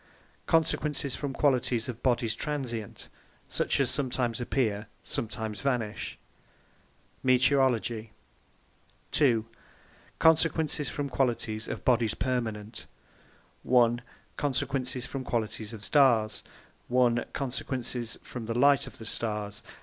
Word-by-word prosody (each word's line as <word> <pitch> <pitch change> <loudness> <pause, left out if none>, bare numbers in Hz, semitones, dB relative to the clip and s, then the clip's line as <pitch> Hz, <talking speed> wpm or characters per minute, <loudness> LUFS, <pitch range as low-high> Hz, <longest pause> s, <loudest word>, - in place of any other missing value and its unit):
Consequences 150 -4 +1
from 145 -2 -3
the - - -10
Qualities 125 -5 +2
of 120 -2 -6
Bodies 120 -3 +1
Transient, 125 -8 -4 0.4
such - - +1
as - - +2
sometimes 125 -3 -1
appear, 110 -4 0 0.2
sometimes 110 -2 -2
vanish 120 -6 -2 1.0
METEOROLOGY 125 -4 +2 1.0
b. 120 -7 +4 0.7
Consequences 160 -3 +3
from 145 - -3
the 135 - -7
Qualities 115 -4 0
of - - -5
Bodies 115 -4 +3
Permanent 110 -4 -3 0.7
1) 120 -1 +3 0.4
Consequences 135 -3 -1
from 135 -1 -5
the - - -11
Qualities 110 -2 -2
of 110 -3 -8
the - - +3
Starres 120 -7 +4 0.5
a) 120 -1 +3
Consequences 125 -3 -3
from 120 -3 -7
the 115 +1 -2
Light 140 +2 +5
of - - -11
the 110 - -9
Starres. 105 -2 -1
125 Hz, 115 wpm, -29 LUFS, 115-135 Hz, 1.0 s, Light